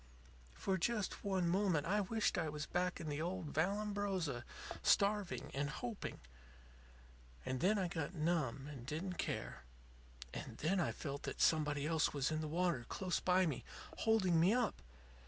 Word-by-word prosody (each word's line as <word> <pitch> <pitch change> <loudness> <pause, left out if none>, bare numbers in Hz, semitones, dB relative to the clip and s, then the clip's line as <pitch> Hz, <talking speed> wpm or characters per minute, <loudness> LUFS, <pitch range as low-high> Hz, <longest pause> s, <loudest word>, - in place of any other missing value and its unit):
"For 190 - 0
just 210 +2 -1
one 190 -3 +1
moment 180 -4 +2
I 205 +4 +2
wished 215 +3 +1
I 165 -3 0
was 150 0 -4
back 180 +2 0
in 165 - -5
the 150 0 -2
old 175 -2 -3
Vallambrosa, 195 - 0 0.4
starving 200 -2 +2
and 140 +1 0
hoping. 230 +5 -4 1.3
And 130 - -1
then 205 +8 +3
I 190 -2 +1
got 165 0 -3
numb, 155 -5 0
and 140 -5 -7
didn't 165 +7 -4
care. 65 - -3 0.7
And - - -6
then 185 +5 +1
I 175 - +1
felt 140 -1 -5
that - - -7
somebody 150 -2 +3
else 160 -1 +2
was 140 +1 +1
in 155 0 0
the 155 - -2
water 170 -4 +1
close 185 -2 -1
by 185 0 +4
me, 150 -7 -2 0.3
holding 195 -7 +3
me 185 +7 +5
up. 245 -5 0
175 Hz, 160 wpm, -38 LUFS, 150-195 Hz, 1.3 s, me